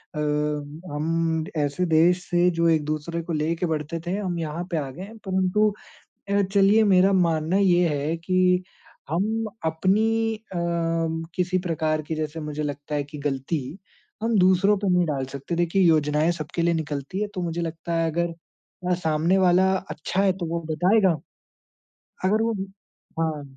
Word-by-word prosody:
अ, -, -, -3 dB, 0.7 s
हम 160 Hz, +1 st, 0 dB
ऐसे 145 Hz, +4 st, 0 dB
देश 175 Hz, +2 st, +3 dB
से 175 Hz, 0 st, +3 dB
जो 170 Hz, 0 st, +1 dB
एक-दूसरे 155 Hz, +1 st, -1 dB
को 165 Hz, 0 st, -5 dB
लेके 160 Hz, +3 st, 0 dB
बढ़ते 160 Hz, 0 st, -2 dB
थे, 180 Hz, -, 0 dB
हम 185 Hz, -4 st, -2 dB
यहाँ 160 Hz, +1 st, -3 dB
पे 170 Hz, -, 0 dB
आ 140 Hz, -3 st, -2 dB
गए 170 Hz, +8 st, -8 dB
हैं। 220 Hz, +3 st, -10 dB
परंतु 190 Hz, +3 st, +2 dB, 0.6 s
अ, 200 Hz, 0 st, +3 dB
चलिए 200 Hz, +3 st, +4 dB
मेरा 185 Hz, +2 st, +5 dB
मानना 170 Hz, -2 st, +2 dB
ये 180 Hz, -3 st, +4 dB
है 150 Hz, +2 st, -1 dB
कि 180 Hz, +1 st, +2 dB, 0.5 s
हम 215 Hz, +7 st, 0 dB, 0.2 s
अपनी 220 Hz, +7 st, +1 dB
अ, 215 Hz, -4 st, -11 dB, 0.8 s
किसी 185 Hz, 0 st, 0 dB
प्रकार 155 Hz, -2 st, 0 dB
की 155 Hz, +2 st, -4 dB
जैसे 155 Hz, +1 st, -4 dB
मुझे 150 Hz, 0 st, -4 dB
लगता 145 Hz, 0 st, -4 dB
है 145 Hz, -1 st, 0 dB
कि 145 Hz, +1 st, -10 dB
गलती, 145 Hz, +2 st, -3 dB, 0.4 s
हम 225 Hz, -1 st, +2 dB
दूसरों 190 Hz, +2 st, +4 dB
पे 200 Hz, 0 st, -1 dB
नहीं 180 Hz, 0 st, +3 dB
डाल 140 Hz, -3 st, -1 dB
सकते। 140 Hz, +5 st, -4 dB
देखिए 175 Hz, +3 st, +2 dB
योजनाएँ 155 Hz, -1 st, +3 dB
सबके 170 Hz, 0 st, -4 dB
लिए 170 Hz, 0 st, +2 dB
निकलती 150 Hz, +3 st, -3 dB
हैं, 210 Hz, -, -1 dB
तो 185 Hz, -, -3 dB
मुझे 170 Hz, 0 st, -2 dB
लगता 165 Hz, 0 st, -4 dB
है 165 Hz, 0 st, +1 dB
अगर 170 Hz, +1 st, -1 dB, 0.6 s
अ, -, -, +4 dB
सामने 165 Hz, +2 st, +1 dB
वाला 185 Hz, +1 st, +4 dB, 0.2 s
अच्छा 180 Hz, +5 st, -1 dB
है 195 Hz, -1 st, +4 dB
तो 175 Hz, -, -3 dB
वो 170 Hz, +1 st, -2 dB
बताएगा। 185 Hz, +3 st, +3 dB, 1.1 s
अगर 210 Hz, +4 st, +3 dB
वो 230 Hz, 0 st, +1 dB, 0.7 s
हाँ। 155 Hz, -2 st, -1 dB
170 Hz, 165 wpm, -24 LUFS, 155-185 Hz, 1.1 s, मेरा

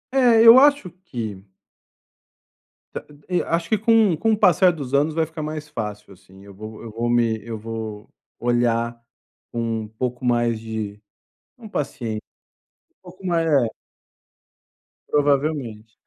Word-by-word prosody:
É, 240 Hz, -4 st, +5 dB
eu 235 Hz, +3 st, +10 dB
acho 285 Hz, -10 st, +3 dB
que 110 Hz, -, -6 dB, 1.5 s
Da -, -, -5 dB, 0.2 s
e 180 Hz, -1 st, +1 dB
acho 165 Hz, 0 st, -2 dB
que 220 Hz, -, +3 dB
com 220 Hz, -4 st, +3 dB
com 225 Hz, +7 st, +1 dB
o 215 Hz, -, 0 dB
passar 185 Hz, -2 st, +5 dB
dos 140 Hz, -6 st, -7 dB
anos 145 Hz, +3 st, +2 dB
vai 160 Hz, -, +2 dB
ficar 160 Hz, 0 st, -8 dB
mais 155 Hz, 0 st, -5 dB
fácil, 105 Hz, -4 st, -6 dB
assim, 95 Hz, +1 st, -18 dB
eu 100 Hz, -, -13 dB
vou 110 Hz, +2 st, -10 dB
eu 115 Hz, -, -8 dB
vou 115 Hz, +2 st, -2 dB
me 115 Hz, -2 st, +2 dB
eu 115 Hz, -1 st, -6 dB
vou 110 Hz, -1 st, -7 dB, 0.3 s
olhar 120 Hz, -1 st, 0 dB, 0.5 s
com 120 Hz, -, -4 dB, 0.2 s
um 105 Hz, -, -8 dB
pouco 125 Hz, +3 st, -5 dB
mais 120 Hz, -2 st, +1 dB
de 110 Hz, -2 st, -6 dB, 0.6 s
não 225 Hz, -3 st, -11 dB
paciên 130 Hz, -, -3 dB
um -, -, -17 dB, 0.7 s
pouco 185 Hz, +1 st, -13 dB
ma 170 Hz, -2 st, +1 dB
é. 145 Hz, -7 st, +3 dB, 1.4 s
Provavelmente. 140 Hz, -7 st, 0 dB
125 Hz, 145 wpm, -22 LUFS, 110-165 Hz, 1.5 s, eu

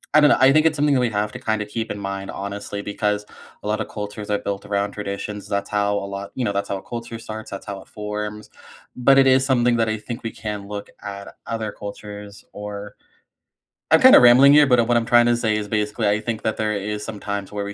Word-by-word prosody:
I -, -, +9 dB
don't 150 Hz, -1 st, +6 dB
know. -, -, +5 dB
I 130 Hz, +1 st, +7 dB
think 155 Hz, +2 st, +4 dB
it's 160 Hz, -, +1 dB
something 145 Hz, -1 st, +2 dB
that 130 Hz, -, +3 dB
we 120 Hz, -, +1 dB
have 105 Hz, -1 st, -1 dB
to, 125 Hz, -, -8 dB
kind 110 Hz, -4 st, -1 dB
of, 105 Hz, -, -4 dB
keep 115 Hz, +2 st, -4 dB
in 105 Hz, -, -5 dB
mind, 100 Hz, 0 st, -5 dB
honestly, 100 Hz, +1 st, -5 dB
because 105 Hz, 0 st, -2 dB, 0.4 s
a -, -, -5 dB
lot 105 Hz, 0 st, 0 dB
of -, -, -4 dB
cultures 105 Hz, 0 st, -7 dB
are 105 Hz, -, +2 dB
built 100 Hz, -1 st, -4 dB
around 100 Hz, 0 st, -1 dB
traditions, 105 Hz, 0 st, -5 dB
that's 100 Hz, 0 st, -2 dB
how 105 Hz, 0 st, +1 dB
a 100 Hz, -1 st, -2 dB
lot 100 Hz, 0 st, -6 dB
you 125 Hz, -, -1 dB
know, 100 Hz, -, 0 dB
that's 100 Hz, 0 st, -2 dB
how 100 Hz, -, -1 dB
a 95 Hz, -, -11 dB
culture 115 Hz, -1 st, -7 dB
starts, 110 Hz, -1 st, -8 dB
that's 100 Hz, -, -7 dB
how 100 Hz, -1 st, -6 dB
it -, -, -18 dB
forms, 105 Hz, 0 st, -6 dB, 0.5 s
but 135 Hz, +2 st, +4 dB
it 135 Hz, -1 st, +6 dB
is 130 Hz, 0 st, +4 dB
something 120 Hz, -3 st, +2 dB
that 115 Hz, -1 st, +1 dB
I 110 Hz, -, -1 dB
think 120 Hz, +3 st, -7 dB
we 115 Hz, -, -3 dB
can 105 Hz, -2 st, -6 dB
look 105 Hz, 0 st, -6 dB
at 100 Hz, -1 st, -8 dB
other 110 Hz, -2 st, -3 dB
cultures, 105 Hz, 0 st, -9 dB
or 105 Hz, 0 st, -7 dB, 1.0 s
I'm, -, -, +6 dB
kind -, -, +9 dB
of, -, -, +9 dB
rambling 125 Hz, +3 st, +8 dB
here, 145 Hz, 0 st, +7 dB
but 125 Hz, -3 st, +4 dB
what 120 Hz, -, +3 dB
I'm 115 Hz, -, 0 dB
trying 120 Hz, -1 st, +5 dB
to 120 Hz, 0 st, +3 dB
say 110 Hz, -2 st, 0 dB
is 105 Hz, -1 st, -3 dB
basically 105 Hz, 0 st, 0 dB
I 105 Hz, +1 st, +2 dB
think 110 Hz, 0 st, -4 dB
that 110 Hz, -, -1 dB
there 110 Hz, -1 st, 0 dB
is 105 Hz, +1 st, -4 dB
some 105 Hz, -3 st, -7 dB
times 100 Hz, -1 st, -4 dB
where 100 Hz, -1 st, -3 dB
we 100 Hz, 0 st, -5 dB
105 Hz, 260 wpm, -22 LUFS, 100-120 Hz, 1.0 s, I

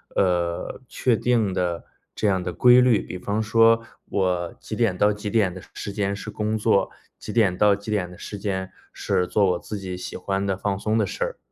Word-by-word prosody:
呃， 90 Hz, +2 st, 0 dB
确 125 Hz, -3 st, +1 dB
定 110 Hz, -5 st, +1 dB
的 90 Hz, -2 st, -2 dB, 0.3 s
这 105 Hz, -, -1 dB
样 95 Hz, -2 st, +1 dB
的 90 Hz, -, -3 dB
规 125 Hz, 0 st, +6 dB
律。 125 Hz, -4 st, +4 dB
比 90 Hz, -, -7 dB
方 100 Hz, +4 st, -2 dB
说 115 Hz, +1 st, +4 dB, 0.3 s
我 90 Hz, -3 st, 0 dB
几 110 Hz, -, -6 dB
点 110 Hz, -6 st, +1 dB
到 105 Hz, +1 st, +4 dB
几 105 Hz, 0 st, -5 dB
点 100 Hz, -5 st, +2 dB
的 95 Hz, -, -9 dB
时 100 Hz, -, -5 dB
间 100 Hz, -1 st, -1 dB
是 -, -, -7 dB
工 110 Hz, +1 st, -2 dB
作？ 105 Hz, -3 st, +2 dB, 0.3 s
几 -, -, -7 dB
点 100 Hz, -6 st, +3 dB
到 105 Hz, 0 st, +5 dB
几 100 Hz, +2 st, -10 dB
点 95 Hz, -4 st, -1 dB
的 90 Hz, -, -12 dB
时 105 Hz, -, -7 dB
间 95 Hz, -2 st, -3 dB, 0.2 s
是 90 Hz, -, 0 dB
做 100 Hz, 0 st, +2 dB
我 90 Hz, -, -1 dB
自 105 Hz, -, -6 dB
己 95 Hz, -2 st, -5 dB
喜 90 Hz, -, -7 dB
欢 95 Hz, +1 st, -2 dB
的 95 Hz, -1 st, 0 dB
放 100 Hz, 0 st, -1 dB
松 110 Hz, +2 st, 0 dB
的 105 Hz, -, +1 dB
事 -, -, -3 dB
儿？ -, -, -4 dB
100 Hz, 235 characters per minute, -24 LUFS, 90-110 Hz, 0.3 s, 规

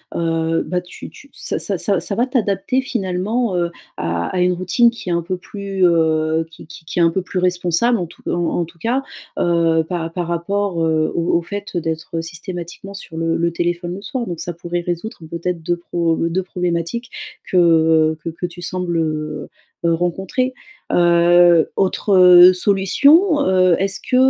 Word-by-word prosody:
heu, 165 Hz, -1 st, 0 dB
bah, 180 Hz, 0 st, -2 dB
tu 180 Hz, -, -11 dB
tu 280 Hz, -, -16 dB
ça -, -, -4 dB
ça 195 Hz, -, -2 dB
ça 195 Hz, +1 st, +1 dB
ça 200 Hz, -, -2 dB
va 240 Hz, -, +2 dB
t'adapter 255 Hz, +2 st, 0 dB
finalement, 205 Hz, -1 st, -2 dB
heu, 175 Hz, -1 st, 0 dB, 0.3 s
à 85 Hz, 0 st, -2 dB
à -, -, 0 dB
une 180 Hz, 0 st, +3 dB
routine 185 Hz, +7 st, +3 dB
qui 230 Hz, -5 st, -8 dB
est -, -, 0 dB
un 170 Hz, -, +1 dB
peu 180 Hz, +2 st, -4 dB
plus, 195 Hz, 0 st, -2 dB
heu, 160 Hz, -1 st, +2 dB
qui 165 Hz, -, -14 dB
qui 160 Hz, +1 st, -13 dB
qui 160 Hz, -, -8 dB
est -, -, +4 dB
un 165 Hz, -, +4 dB
peu 190 Hz, -, -1 dB
plus 185 Hz, +1 st, -6 dB
responsable, 180 Hz, +5 st, +1 dB
en 175 Hz, -, -3 dB
tout -, -, -18 dB
en 175 Hz, 0 st, -1 dB
en -, -, -1 dB
tout 165 Hz, +1 st, -19 dB
cas, 245 Hz, +8 st, -1 dB, 0.3 s
heu, 165 Hz, -2 st, +2 dB
par 165 Hz, -2 st, -3 dB
par 175 Hz, -1 st, -2 dB
rapport, 175 Hz, +1 st, -1 dB
heu, 160 Hz, -1 st, +1 dB
au 170 Hz, 0 st, -1 dB
au -, -, -1 dB
fait 200 Hz, 0 st, -6 dB
d'être 165 Hz, 0 st, -3 dB
systématiquement 175 Hz, +3 st, -8 dB
sur 165 Hz, -4 st, -10 dB
le 165 Hz, 0 st, 0 dB
le 170 Hz, 0 st, 0 dB
téléphone 175 Hz, +1 st, -2 dB
le 195 Hz, -, -7 dB
soir. 245 Hz, +3 st, -4 dB
Donc 175 Hz, -6 st, -6 dB
ça 175 Hz, -, -4 dB
pourrait 175 Hz, +1 st, -4 dB
résoudre 175 Hz, +7 st, -4 dB
peut-être 170 Hz, 0 st, -3 dB
2 175 Hz, +2 st, -1 dB
pro 170 Hz, -1 st, -1 dB
2 170 Hz, +3 st, -1 dB
problématiques 180 Hz, +6 st, -3 dB, 0.4 s
que, 185 Hz, -, +2 dB
heu, 160 Hz, -2 st, +4 dB
que -, -, -3 dB
que 165 Hz, +2 st, -5 dB
tu 175 Hz, 0 st, -11 dB
sembles, 180 Hz, -1 st, -2 dB
heu 155 Hz, -1 st, -3 dB, 0.4 s
heu, 170 Hz, -, +3 dB
rencontrer. 190 Hz, +9 st, -1 dB, 0.4 s
Heu, 175 Hz, -1 st, +5 dB
autre 185 Hz, -2 st, +6 dB
solution, 280 Hz, -, +3 dB
heu, 185 Hz, -2 st, +4 dB
est-ce 195 Hz, +1 st, 0 dB
que, 255 Hz, -, -3 dB
175 Hz, 190 wpm, -19 LUFS, 165-195 Hz, 0.4 s, autre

